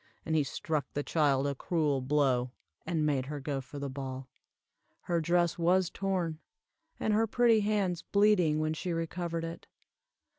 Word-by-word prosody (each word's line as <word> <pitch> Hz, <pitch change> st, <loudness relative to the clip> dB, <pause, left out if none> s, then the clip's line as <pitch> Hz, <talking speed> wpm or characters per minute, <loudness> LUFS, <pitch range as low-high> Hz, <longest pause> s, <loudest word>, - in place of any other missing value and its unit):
And 160 Hz, -, 0 dB
he 155 Hz, -, +4 dB
struck 150 Hz, +2 st, -3 dB
the 145 Hz, -, -1 dB
child 140 Hz, -4 st, +2 dB
a 140 Hz, -, 0 dB
cruel 145 Hz, -1 st, 0 dB
blow, 130 Hz, -2 st, +2 dB, 0.4 s
and 160 Hz, -4 st, 0 dB
made 135 Hz, -3 st, 0 dB
her 145 Hz, 0 st, -4 dB
go 140 Hz, -1 st, -3 dB
for 135 Hz, +2 st, -10 dB
the 140 Hz, 0 st, -3 dB
ball. 130 Hz, -1 st, -6 dB, 0.7 s
Her 170 Hz, -2 st, 0 dB
dress 175 Hz, +1 st, +1 dB
was 180 Hz, +1 st, +3 dB
torn, 180 Hz, -5 st, -2 dB, 0.6 s
and 215 Hz, -, +1 dB
her 225 Hz, +2 st, +3 dB
pretty 235 Hz, 0 st, +4 dB
hands 200 Hz, -5 st, 0 dB
bleeding 200 Hz, -7 st, +3 dB
when 155 Hz, 0 st, 0 dB
she 170 Hz, +2 st, -3 dB
recovered 165 Hz, 0 st, -3 dB
it. 165 Hz, 0 st, -7 dB
160 Hz, 160 wpm, -31 LUFS, 140-180 Hz, 0.7 s, he